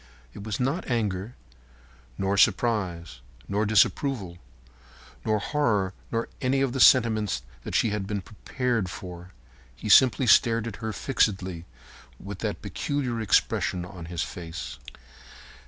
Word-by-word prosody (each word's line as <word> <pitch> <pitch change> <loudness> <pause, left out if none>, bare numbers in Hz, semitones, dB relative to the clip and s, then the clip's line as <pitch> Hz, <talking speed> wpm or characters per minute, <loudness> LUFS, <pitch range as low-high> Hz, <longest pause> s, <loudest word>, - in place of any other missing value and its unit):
It 100 - -9
was 105 -2 -4
not 135 +8 -1
anger, 110 -2 -2 0.8
nor 95 +1 0
surprise, 95 - +1 0.3
nor 105 +2 0
disapproval, 105 -3 +1 0.8
nor 110 - +1
horror, 105 -7 0 0.2
nor 115 0 -1
any 135 +1 +1
of 135 -3 0
the 135 - -2
sentiments 110 - +4 0.2
that - - -5
she 110 - +2
had 105 -2 -3
been 100 -1 -2
prepared 115 +1 -2
for. 90 -1 -9 0.5
He 105 - -6
simply 130 +2 +6
stared 115 0 +4
at 115 -3 -6
her 110 -1 -4
fixedly 95 -8 -1 0.5
with - - -8
that - - -4
peculiar 130 -5 -2
expression 90 -3 +1
on 90 -2 -9
his 85 0 -3
face. 80 -8 -7
105 Hz, 130 wpm, -26 LUFS, 95-120 Hz, 0.8 s, simply